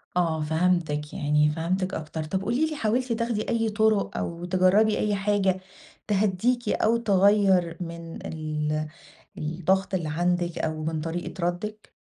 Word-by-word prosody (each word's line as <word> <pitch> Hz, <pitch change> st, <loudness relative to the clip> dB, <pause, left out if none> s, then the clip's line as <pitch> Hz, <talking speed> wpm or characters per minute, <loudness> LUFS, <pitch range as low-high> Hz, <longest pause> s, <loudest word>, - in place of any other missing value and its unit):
آه، 165 Hz, -3 st, +1 dB
فَهمتِك، 160 Hz, -2 st, 0 dB
يعني 150 Hz, +1 st, +2 dB
فَهمتِك 180 Hz, +4 st, -1 dB
أكتر 155 Hz, 0 st, -4 dB
طب 190 Hz, +5 st, -2 dB
قولي 240 Hz, +10 st, +1 dB
لي 310 Hz, -, -4 dB
حاولتِ 245 Hz, 0 st, 0 dB
تاخدي 230 Hz, -2 st, -2 dB
أي 225 Hz, -1 st, +1 dB
طُرق، 215 Hz, -1 st, +1 dB
أو 170 Hz, +1 st, -4 dB
تجرّبي 185 Hz, +4 st, +3 dB
أي 210 Hz, -1 st, +1 dB
حاجة 195 Hz, -2 st, +1 dB, 0.5 s
تهدّيكِ 210 Hz, +4 st, +1 dB
أو 230 Hz, +2 st, +2 dB
تغيّر 195 Hz, -5 st, +3 dB
من 170 Hz, -1 st, -7 dB
ال 155 Hz, -1 st, -2 dB, 0.5 s
الضغط 180 Hz, +5 st, 0 dB
اللّي 170 Hz, -4 st, -1 dB
عندِك 175 Hz, +2 st, 0 dB
أو 155 Hz, -1 st, -2 dB
من 160 Hz, 0 st, -2 dB
طريقة 170 Hz, +3 st, -5 dB
ردِّك؟ 210 Hz, +5 st, -4 dB
180 Hz, 140 wpm, -26 LUFS, 160-210 Hz, 0.5 s, تجرّبي